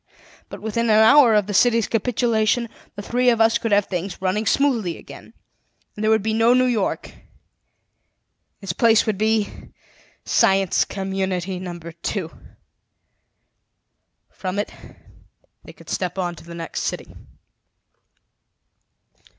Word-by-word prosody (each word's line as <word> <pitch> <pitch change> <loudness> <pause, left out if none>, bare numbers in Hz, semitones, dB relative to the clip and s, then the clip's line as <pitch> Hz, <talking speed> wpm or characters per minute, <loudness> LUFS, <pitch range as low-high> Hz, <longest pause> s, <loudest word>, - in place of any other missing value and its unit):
But, - - -10
within 220 +2 -1
an 215 - +5
hour 240 -1 +6
of 210 -2 +3
the 205 - -5
city's 230 +1 +3
capitulation, 230 0 0 0.3
the 205 - -7
three 250 +3 +1
of 230 -2 +2
us 225 0 +3
could 230 - -3
have 205 -1 +3
things 180 0 -5
running 190 +3 -1
smoothly 235 -12 +1
again. - - -13 0.6
And 210 - -5
there 215 - +2
would 220 -2 +3
be 220 0 -1
no 225 +2 +4
New 255 0 +3
York; 230 -6 -1
in - - -19 1.4
its 195 -3 -4
place 225 +2 +3
would 215 -4 -2
be 215 -1 -1 0.6
Science 195 -1 +2
Community 190 -1 -3
Number 175 -2 -7
Two. 170 +1 -4 2.0
From 185 0 -5
it 205 - -2 0.9
they - - -12
could - - -18
step 180 0 -3
on 175 -2 -2
to - - -13
the 170 0 -10
next 165 -1 -5
city." - - -4
210 Hz, 135 wpm, -21 LUFS, 190-225 Hz, 2.0 s, hour